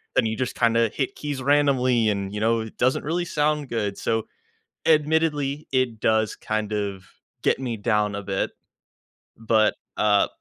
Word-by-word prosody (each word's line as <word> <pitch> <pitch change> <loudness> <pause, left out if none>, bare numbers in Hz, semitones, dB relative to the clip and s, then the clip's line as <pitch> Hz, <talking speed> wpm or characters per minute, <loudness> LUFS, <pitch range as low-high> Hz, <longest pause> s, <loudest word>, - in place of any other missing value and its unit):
then - - +4
you 110 0 -1
just 130 0 -3
kinda 115 -1 +3
hit 135 +3 -2
keys 145 -3 -4
randomly 130 -5 +3
and, 100 -1 -2
you 105 - -3
know, 115 +1 +2
it 110 -1 -9
doesn't 130 +1 +2
really 170 +4 -1
sound 150 -3 0
good. 105 -4 -2
So, 115 -1 -1 0.6
admittedly, 150 -2 +2
it 130 -4 0
does 110 -1 +2
kind 110 -1 -3
of 100 -2 -3 0.4
get - - +3
me 120 -4 -3
down 105 -1 +1
a 100 - -4
bit. 95 0 -2 0.9
But, 110 -1 +2 0.2
uh, 105 -1 +4
115 Hz, 160 wpm, -24 LUFS, 105-140 Hz, 0.9 s, then